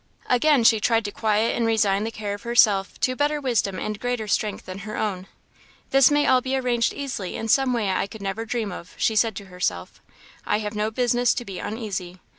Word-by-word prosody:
Again 260 +1 +3
she 225 -1 +5
tried 225 +1 +1
to 205 - -3
quiet 220 +1 +1
and 235 - 0
resign 210 -2 +2
the - - -2
care 210 -2 -5
of 205 - -7
herself 215 -5 +3
to 255 - +1
better 295 +2 0
wisdom 230 -8 0
and 215 +1 -4
greater 245 -3 -2
strength 210 0 -1
than 185 +1 -7
her 215 +1 -6
own. 195 -3 -3 0.6
"This 270 -1 +6
may 290 0 +2
all 255 -1 +4
be 265 +1 -1
arranged 245 -3 +1
easily 255 -10 -5
in 225 - -4
some 265 +3 +3
way 220 -5 0
I 185 - 0
could 210 0 -10
never 195 +3 -3
dream 225 -2 -3
of," 180 0 -10
she 220 - +1
said 220 -1 +2
to 200 - -7
herself; 175 - -4 0.4
"I 210 - +1
have 210 0 -4
no 210 0 -1
business 245 +1 +1
to 240 - -4
be 195 -3 -7
uneasy. 195 -5 -5
220 Hz, 220 wpm, -24 LUFS, 200-245 Hz, 0.6 s, This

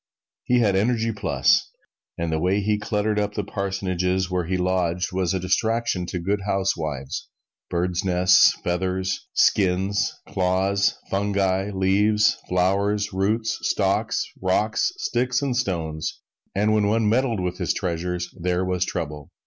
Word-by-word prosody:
He 125 0 +3
had 100 -4 +2
energy 115 +3 +1
plus, 105 - +2 0.5
and 85 -1 -2
the 80 - 0
way 95 +4 +1
he 105 +1 0
cluttered 105 0 0
up 105 0 -2
the 105 - -1
parsonages 95 -2 -1
where 90 -2 0
he 95 +1 0
lodged 90 -1 0
was 90 -2 0
a - - 0
distraction 110 0 0
to 90 - -4
good 100 +4 -1
housewives: 80 -9 -2 0.4
birds' 90 +1 -1
nests, 90 0 +5
feathers, 95 +1 -2
skins, 95 +1 +2 0.2
claws, 95 +2 +1
fungi, 95 -1 0
leaves, 105 +2 +2
flowers, 100 +3 +1
roots, 110 +4 0
stalks, - - 0 0.2
rocks, 105 - +1
sticks 125 - 0
and 135 -3 0
stones 80 -9 -2 0.4
and 105 +2 +2
when 105 -1 +2
one 110 +1 +2
meddled 115 -1 +1
with 90 -1 -3
his - - 0
treasures, 90 0 -3
there 90 +1 -1
was 90 -1 0
trouble. 75 -4 -5
95 Hz, 140 wpm, -23 LUFS, 90-105 Hz, 0.5 s, nests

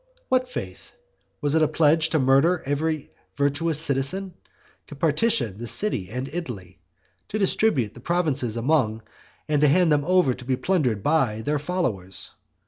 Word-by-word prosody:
What 255 0 +1
faith? - - -8 0.5
Was 145 -1 +1
it 160 - +3
a 155 - +4
pledge 155 +1 +3
to 160 - +1
murder 140 +6 +3
every 150 +2 -2 0.3
virtuous 145 +2 +1
citizen, 160 +6 -1 0.5
to 145 - -10
partition 150 - +1
the 120 - -5
city 115 - 0
and 125 +4 -4
Italy, 120 - -7 0.5
to 215 - -2
distribute 190 - +1
the - - -13
provinces 140 -7 0
among, 115 -4 +1 0.4
and 150 -2 +1
to 150 - +5
hand 170 +3 +3
them 145 -1 +3
over 180 -6 +3
to 125 - -11
be 130 +1 0
plundered 125 - 0
by, 130 -8 +1
their 150 +3 0
followers? 125 - -3
145 Hz, 155 wpm, -24 LUFS, 125-165 Hz, 0.5 s, to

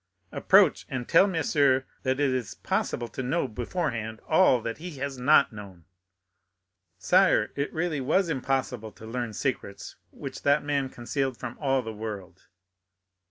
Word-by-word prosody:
"Approach, - - +4
and 125 -2 -4
tell 195 - +5
monsieur 145 -7 +2 0.2
that 130 +1 -1
it 145 -2 +2
is 125 -6 -3
possible 120 - -2
to 120 - -5
know 135 +4 0
beforehand 115 -3 -3
all 160 -6 +5
that 115 +4 -4
he 170 -3 -8
has 135 -1 -4
not 140 -1 +4
known." 95 -5 -11 1.1
"Sire, 185 - +3
it 140 0 -2
was - - -16
really 165 +2 0
impossible 130 -5 -2
to 110 - -13
learn 120 0 -4
secrets 105 -4 -4
which - - -8
that 145 +1 +3
man 140 -2 -1
concealed 130 +1 -3
from 120 - -6
all 135 -3 +1
the 110 -1 -6
world." 100 -5 -8
130 Hz, 150 wpm, -27 LUFS, 115-145 Hz, 1.1 s, tell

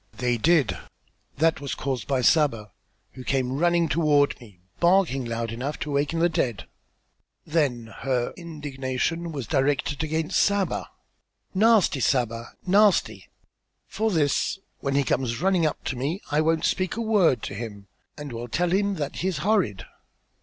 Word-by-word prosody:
"They 120 -1 0
did. 155 0 +3 0.6
That 160 0 +2
was 140 - -4
caused 130 -4 -3
by 135 -2 +1
Saba, 120 -7 +2 0.4
who 130 - -10
came 130 0 -1
running 170 0 +3
toward 145 -2 +2
me, 105 -7 -15 0.2
barking 170 -7 +3
loud 115 -1 -3
enough 130 +6 -4
to 150 - -3
awaken 145 +3 0
the 170 +1 +4
dead." 135 - -2 0.8
Then 130 -8 -1
her 125 -3 -1
indignation 150 0 -3
was 140 -6 -5
directed 145 +4 0
against 160 0 0
Saba. 200 -1 +1 0.6
"Nasty 210 -7 +4
Saba! 115 -2 0
nasty! 200 +1 +3 0.6
For 220 +1 -1
this 155 -2 +1 0.2
when 140 -1 -2
he 140 - +3
comes 125 -3 -1
running 185 -2 +2
up - - -5
to - - -3
me 140 +9 -2
I 150 +1 +3
won't 160 +1 +1
speak 185 -1 0
a 230 - -3
word 205 - +3
to - - -4
him 100 -2 -7 0.3
and 145 -4 -7
will 120 +1 -5
tell 170 +8 0
him 200 +1 +1
that 145 -5 -4
he 185 - -1
is 185 -5 -1
horrid." 185 - +1
145 Hz, 155 wpm, -25 LUFS, 125-170 Hz, 0.8 s, the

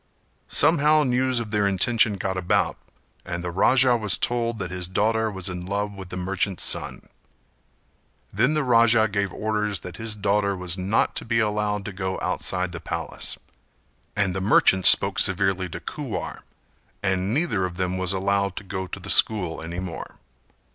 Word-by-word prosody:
Somehow 155 -1 +3
news 130 -1 +1
of 110 -3 -6
their 105 -2 +1
intention 110 +3 +2
got 95 0 -3
about, 90 -1 0 0.5
and 85 0 -5
the 90 - -3
Raja 125 +7 +4
was 105 -4 +2
told 120 -1 0
that 95 -4 -5
his 90 -1 -2
daughter 110 +4 0
was 95 -3 -3
in 90 -1 -3
love 100 +2 -2
with 95 -2 -10
the 90 - -6
merchant's 95 +1 -2
son. - - 0 1.3
Then 125 +10 +2
the 150 - +1
Raja 115 -3 +4
gave 100 -2 -2
orders 105 -1 -2
that 90 -2 -9
his 110 -1 -1
daughter 100 -1 0
was 90 -1 -1
not 95 +3 0
to - - 0
be 115 0 -1
allowed 105 -2 -1
to 105 - -6
go 95 0 -3
outside 90 -1 -2
the 85 - -7
palace, 80 - -4 0.8
and 100 -3 +1
the 95 - -2
merchant 95 -2 +4
spoke - - +5
severely 95 -1 +2
to - - -7
Kuwar - - -6 0.6
and 95 0 0
neither 130 - 0
of 90 -1 -4
them 90 0 -1
was 95 -1 0
allowed 100 0 0
to - - -6
go 95 -1 -5
to - - -7
the - - -3
school 90 -7 +3
any 85 +2 -5
more. 90 -2 -7
100 Hz, 175 wpm, -24 LUFS, 95-110 Hz, 1.3 s, spoke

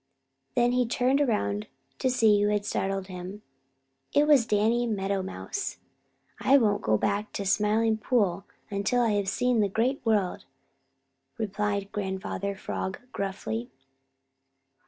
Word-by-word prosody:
Then 240 0 +3
he 250 -1 +2
turned 255 +4 +2
around 105 - 0 0.3
to 260 - +1
see 220 -5 +4
who 205 - +3
had 210 -1 0
startled 195 -1 -1
him 185 +2 -8 0.7
so. - - +3
It 300 - +2
was 275 -6 +5
Danny 225 +3 +2
Meadow 195 -2 -1
Mouse. 385 - -5 0.6
"I 275 - +5
won't 210 -5 +2
go 110 0 +2
back 205 - -1
to 200 - -3
the - - -8
Smiling 215 +2 +2
Pool 200 -6 +1 0.3
until 205 +5 +1
I 230 - +2
have 205 -2 0
seen 250 +3 +1
the 205 -2 +2
Great 245 +7 0
World," 210 -6 0 0.9
replied 205 -1 -2
Grandfather 200 0 -3
Frog 190 0 -4
gruffly. 120 - -3
210 Hz, 140 wpm, -27 LUFS, 195-235 Hz, 0.9 s, was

